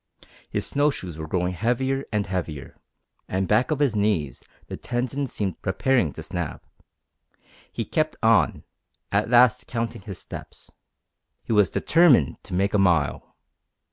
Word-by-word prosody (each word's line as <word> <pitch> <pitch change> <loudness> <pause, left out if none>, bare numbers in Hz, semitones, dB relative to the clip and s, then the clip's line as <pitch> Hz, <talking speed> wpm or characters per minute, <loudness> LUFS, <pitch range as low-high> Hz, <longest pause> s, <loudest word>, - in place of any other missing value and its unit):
His - - -2
snow 145 +1 +2
shoes 90 - -6
were 80 - -5
growing 90 +2 -1
heavier 130 +7 -1
and 105 -2 0
heavier, 85 -7 -5 0.5
and 95 0 -1
back 110 +7 +2
of 155 - 0
his 140 -6 +1
knees 100 -9 0 0.2
the - - -6
tendons 130 +2 -3
seemed 95 -5 -3
preparing 105 - +1
to 80 - -8
snap. 85 -1 -5 1.1
He - - -4
kept - - -1
on, - - +3 0.5
at 100 +3 +1
last 120 -1 +4
counting 115 -3 -3
his 95 -1 -8
steps. - - -10 0.7
He - - -2
was 105 -5 +4
determined 155 - +4
to - - -4
make 100 +2 +1
a 105 - +3
mile. 85 -8 +1
105 Hz, 145 wpm, -24 LUFS, 90-125 Hz, 1.1 s, last